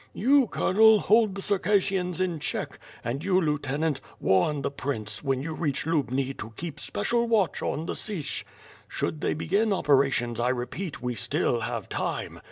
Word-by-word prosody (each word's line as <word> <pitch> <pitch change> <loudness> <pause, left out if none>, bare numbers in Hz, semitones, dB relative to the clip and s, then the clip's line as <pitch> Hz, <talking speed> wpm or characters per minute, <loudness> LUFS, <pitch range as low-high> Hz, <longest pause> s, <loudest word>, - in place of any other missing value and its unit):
You, 270 +3 +4
Colonel, 220 +3 +5
hold 215 -2 +3
the 195 - -5
Circassians 190 -3 +1
in 180 -4 -1
check; - - -3 0.2
and 130 +6 -3
you, 185 -1 +3
lieutenant, 150 -2 -1 0.2
warn 115 +10 +2
the - - -1
Prince, 110 -7 -4
when 135 -1 0
you 160 +1 -4
reach 150 -4 -2
Lubni 135 -4 0
to 110 - -7
keep 165 -4 -6
special 235 0 +1
watch 210 -8 +1
on 155 - -2
Sich. 190 -9 -3 0.4
Should 155 - -3
they - - 0
begin 200 +8 +1
operations 135 - +2
I 120 +1 +2
repeat 130 +6 -4
we 125 0 -1
still 120 0 0
have 115 -2 -4
time. - - -3
155 Hz, 160 wpm, -27 LUFS, 130-195 Hz, 0.4 s, Colonel